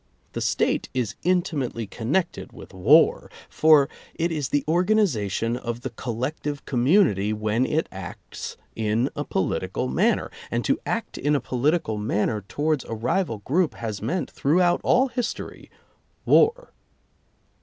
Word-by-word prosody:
The - - -3
State - - 0
is 120 -6 -1
in 180 0 +2
timately 130 - -3
connected 140 - -2
with - - -12
war, 125 - +4 0.2
for 155 -3 +5 0.3
it 170 +1 0
is 150 -5 -2
the 145 -1 +1
organi 185 +7 +3
zation 115 - -1
of 120 -1 -5
the 130 - -5
collective 130 +5 -4
community 120 - +3
when 110 +4 0
it 160 +2 0
acts 95 -1 -8 0.2
in 110 +3 0
a - - -2
political - - -2
manner, 65 +1 +1 0.2
and - - -2
to - - +1
act - - -3
in 145 +2 +2
a - - +2
political 125 -2 0
man 105 0 0
ner 110 -2 -3
towards 145 +8 -1
a 115 - -5
rival 120 - -1
group 155 -2 +1
has 110 -4 -5
meant, 145 - -2
throughout 175 +5 +2
all 260 +2 +3
history 245 -1 -5 0.3
— - - -42
war. 480 +3 +3
130 Hz, 150 wpm, -24 LUFS, 110-165 Hz, 0.3 s, for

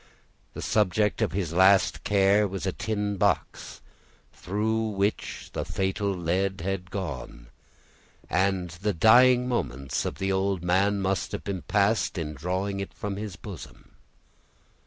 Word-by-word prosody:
The - - -5
subject 105 0 +1
of - - +1
his 90 -3 -2
last 95 +2 +4
care 100 +1 +3
was 95 0 -5
a 95 - 0
tin 105 0 -2
box, 100 +1 -1 0.5
through 110 +3 -1
which 100 0 -2
the - - -2
fatal 95 +1 -1
lead 95 +1 -1
had 90 0 -3
gone; 65 -11 -6 0.8
and 95 -1 0
the 100 +5 -2
dying 125 +7 +6
moments 70 - -2
of - - -3
the 95 0 -1
old 95 -2 0
man 100 +3 +2
must 95 -3 -1
have - - -4 0.2
passed 105 0 +1
in 75 -3 -3
drawing 95 +6 -2
it 100 - -6
from 100 -1 -4
his 105 -2 -6
bosom. 100 -3 -11
95 Hz, 135 wpm, -26 LUFS, 90-105 Hz, 0.8 s, dying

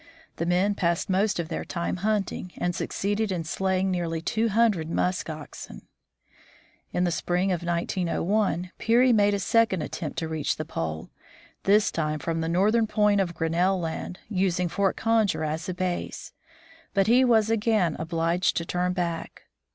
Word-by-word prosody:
The 170 - -2
men 185 +4 +2
passed 170 -1 0
most 195 +1 +1
of 165 -1 -3
their 165 - -3
time 170 +1 -3
hunting, 200 -2 -2
and 175 - -1
succeeded 205 +3 -1
in 175 -3 -2
slaying 190 +3 0
nearly 170 -2 -1
two 220 +7 0
hundred 210 -7 +2
musk 180 0 -1
oxen. 150 - -8 1.1
In 180 - 0
the 175 - +1
spring 180 +3 0
of 175 -2 -1
1901 175 +2 -1
Peary 240 +2 +4
made 205 -2 +4
a - - -2
second 225 -4 +2
attempt 155 - -5
to 165 - -2
reach 160 -2 -1
the 155 - -5
pole, 80 - -4 0.5
this 205 +2 +4
time 155 -2 -1
from 165 +2 -2
the 160 - -1
northern 215 +6 +3
point 210 -1 +3
of 175 -3 -2
Grin 165 0 -1
nell 185 +3 +2
land, 170 +2 -4
using 185 -3 0
Fort 195 +2 0
Conger 220 -7 +1
as 155 +3 -3
a - - -1
base. 180 -1 -3 0.6
But 195 -1 +4
he 245 +4 +5
was 225 -3 +3
again 215 -7 +2
obliged 165 +2 0
to 170 - -1
turn 180 +1 -1
back. 170 -2 -4
180 Hz, 165 wpm, -26 LUFS, 170-205 Hz, 1.1 s, he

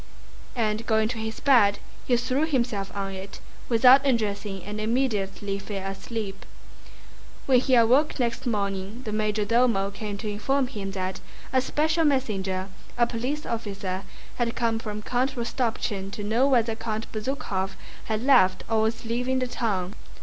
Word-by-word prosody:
And 220 -1 -1
going 220 -1 +3
to 230 -2 -3
his 220 0 -4
bed 220 -8 +5 0.3
he 245 - +4
threw 255 +5 0
himself 235 -9 -1
on 195 -1 -2
it 190 +1 -8 0.3
without 250 +3 +7
undressing 205 -6 -1
and 210 +1 -5
immediately 210 -4 -1
fell 195 -1 -5
asleep. 195 0 -5 1.0
When 260 -2 +5
he 260 0 +3
awoke 255 +7 +4
next 245 +1 -1
morning 200 +1 -2
the 215 - -4
major 215 0 0
domo 230 -4 +2
came 205 0 -5
to 215 - -6
inform 260 +7 +1
him 205 -6 -5
that 185 -1 -3 0.3
a 260 - +4
special 315 +5 +1
messenger, 195 -10 0 0.3
a 240 - +5
police 255 +6 -3
officer, 200 -4 -3 0.4
had 235 -1 0
come 230 -2 +1
from 210 -1 -5
Count 255 +4 0
Rostopchín 230 -5 -2
to 205 - -5
know 230 +6 +2
whether 235 -4 +3
Count 220 -1 -4
Bezúkhov 210 -5 -2 0.3
had 220 +1 -2
left 250 -9 +5
or 225 -1 +2
was 225 +1 -1
leaving 250 +3 0
the 255 - +1
town. 200 -6 -2
225 Hz, 155 wpm, -26 LUFS, 200-250 Hz, 1.0 s, without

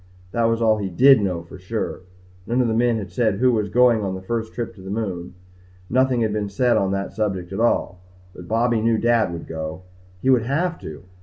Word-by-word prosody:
That 115 +2 +1
was 115 0 +1
all 110 -1 +4
he 100 -2 -3
did 130 +6 +6
know 90 -4 -2
for 85 +2 -12
sure. 110 +5 -4 0.5
None 120 +2 0
of 125 - +3
the 110 - 0
men 120 0 +2
had 105 -2 -6
said 110 -5 +1
who 125 +5 +3
was 105 -4 0
going 120 +1 +4
on 95 -2 -2
the 95 - -7
first 115 +2 -3
trip 120 0 -5
to 95 - -15
the 95 - -9
moon. 95 -5 -4 0.6
Nothing 130 0 +2
had 110 -2 0
been 105 -1 -2
said 120 +4 +2
on 95 - +1
that 100 0 -3
subject 95 -4 -2
at 95 - -3
all, 115 -5 +1 0.3
but 90 -2 -11
Bobby 115 +1 +1
knew 115 0 +2
Dad 115 -4 +2
would 85 -1 -6
go. 80 +2 -6 0.4
He 130 - +2
would 125 -3 +4
have 165 +5 -1
to. 80 +1 -9
110 Hz, 230 wpm, -22 LUFS, 95-120 Hz, 0.6 s, did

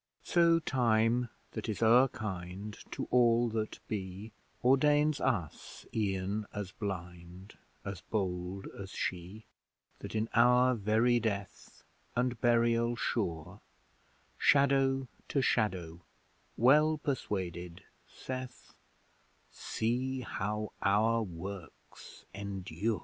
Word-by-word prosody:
So 170 -1 +4
Time 120 -4 +2 0.2
that - - -5
is 110 +1 -2
o'er 120 +4 +6
kind, 100 -3 -6
To - - -5
all 120 -1 +4
that 110 -1 -3
be, 100 +1 -5 0.3
Ordains 145 +3 +4
us 95 - -2
e'en 100 0 -1
as 100 -3 -5
blind, 90 -2 -7 0.3
As 95 -3 -5
bold 95 -2 -2
as 95 -1 -6
she: 95 +4 -4 0.5
That - - -7
in 110 +1 0
our 125 +2 +5
very 115 +2 +2
death, 100 -4 -5 0.3
And 125 -1 0
burial 115 0 +3
sure, 90 -5 -3 0.8
Shadow 135 -1 +3 0.2
to 140 - 0
shadow, 90 -9 0 0.6
well 150 +6 +5
persuaded, 95 - -3 0.3
saith, 130 -1 -7 0.8
'See 130 +3 -2
how 105 -2 -3
our 110 +3 +3
works 95 -2 -9
endure!' 100 +1 -3
110 Hz, 100 wpm, -32 LUFS, 95-125 Hz, 0.8 s, o'er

